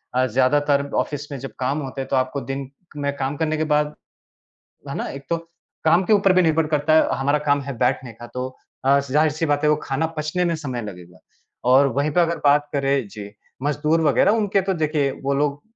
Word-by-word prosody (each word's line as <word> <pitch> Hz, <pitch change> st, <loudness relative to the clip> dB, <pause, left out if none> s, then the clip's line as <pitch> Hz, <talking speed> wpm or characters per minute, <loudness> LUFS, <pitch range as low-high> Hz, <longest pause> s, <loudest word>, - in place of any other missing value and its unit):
अ, 130 Hz, 0 st, +3 dB
ज़्यादातर 140 Hz, +3 st, +2 dB
ऑफ़िस 145 Hz, 0 st, -7 dB
में 140 Hz, -, -5 dB
जब 135 Hz, -3 st, -7 dB
काम 135 Hz, +4 st, 0 dB
होते 135 Hz, 0 st, -5 dB
हैं 135 Hz, -, -5 dB
तो 135 Hz, -, +1 dB
आपको 130 Hz, +2 st, 0 dB
दिन 135 Hz, -1 st, -5 dB, 0.3 s
में 140 Hz, 0 st, -2 dB
काम 135 Hz, +2 st, -2 dB
करने 155 Hz, -1 st, 0 dB
के 155 Hz, -, 0 dB
बाद 150 Hz, 0 st, 0 dB, 1.0 s
है -, -, -4 dB
ना? -, -, -3 dB
एक 140 Hz, 0 st, -8 dB
तो 170 Hz, -, +2 dB, 0.5 s
काम 170 Hz, +4 st, +4 dB
के 220 Hz, -, +1 dB
ऊपर 200 Hz, -2 st, +5 dB
भी 185 Hz, 0 st, +4 dB
निर्भर 160 Hz, -1 st, +2 dB
करता 155 Hz, 0 st, +2 dB
है, 160 Hz, -, +5 dB
हमारा 140 Hz, +2 st, +2 dB
काम 145 Hz, 0 st, +3 dB
है 135 Hz, -2 st, -6 dB
बैठने 125 Hz, -1 st, 0 dB
का 120 Hz, +2 st, -11 dB
तो 125 Hz, 0 st, -2 dB, 0.4 s
अ, 140 Hz, +1 st, +5 dB
ज़ाहिर-सी 150 Hz, +3 st, +1 dB
बात 145 Hz, 0 st, +1 dB
है 150 Hz, -, +4 dB
वह 150 Hz, -, +2 dB
खाना 140 Hz, +4 st, -1 dB
पचने 155 Hz, +4 st, -1 dB
में 170 Hz, -1 st, +1 dB
समय 130 Hz, -6 st, -4 dB
लगेगा 90 Hz, -3 st, -10 dB, 0.5 s
और 135 Hz, +2 st, +6 dB
वहीं 150 Hz, +2 st, +1 dB
पर 175 Hz, -, +3 dB
अगर 170 Hz, 0 st, +1 dB
बात 145 Hz, +1 st, +4 dB
करें 135 Hz, -5 st, 0 dB
जी, 100 Hz, 0 st, -9 dB, 0.3 s
मज़दूर 150 Hz, +3 st, +1 dB
वग़ैरह 145 Hz, -, +4 dB
उनके 205 Hz, -3 st, +2 dB
तो 190 Hz, +1 st, 0 dB
देखिए 150 Hz, -3 st, 0 dB
वो 140 Hz, 0 st, +1 dB
लोग 145 Hz, 0 st, -1 dB
145 Hz, 215 wpm, -22 LUFS, 135-155 Hz, 1.0 s, और